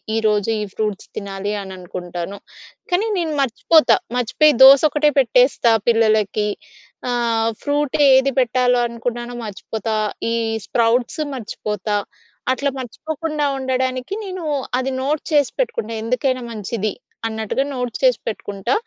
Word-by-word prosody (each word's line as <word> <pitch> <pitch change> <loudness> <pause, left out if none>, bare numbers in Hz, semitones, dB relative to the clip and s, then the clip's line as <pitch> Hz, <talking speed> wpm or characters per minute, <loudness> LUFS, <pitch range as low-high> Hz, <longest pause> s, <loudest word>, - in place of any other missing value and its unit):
ఈరోజు 215 -1 +1
ఈ - - -1
ఫ్రూట్స్ 210 -3 -3
తినాలి 200 0 -4
అని 190 -1 -8
అనుకుంటాను. 180 +1 -6 0.5
కానీ 395 +5 +2
నేను 325 -3 -1
మర్చిపోతా. 270 0 +4 0.2
మర్చిపోయి 270 +5 +3
దోసొక్కటే 295 +2 +7
పెట్టేస్తా 250 -1 +4 0.2
పిల్లలకి. 215 -2 +2 0.6
ఆహ్, 230 -2 +1
ఫ్రూట్ 290 -1 -1
ఏది 265 +1 +5
పెట్టాలో 250 0 +2
అనుకున్నానో 240 +1 -5
మర్చిపోతా. 220 +2 -4 0.4
ఈ - - +1 0.3
స్ప్రౌట్స్ 235 +5 +1
మర్చిపోతా. 210 -3 -3 0.6
అట్లా 280 +2 0
మర్చిపోకుండా 305 +5 -3
ఉండడానికి 260 +2 -2
నేను 370 -3 -6 0.4
అది 265 +1 -2
నోట్ 290 +3 0
చేసి 290 -3 +3
పెట్టుకుంటా. 230 - -1
ఎందుకైనా 255 +2 0
మంచిది, 215 -1 -3 0.4
అన్నట్టుగా 220 +3 -2
నోట్ 250 -2 -3
చేసి - - +4
పెట్టుకుంటా. 200 - -3
245 Hz, 115 wpm, -20 LUFS, 215-275 Hz, 0.6 s, దోసొక్కటే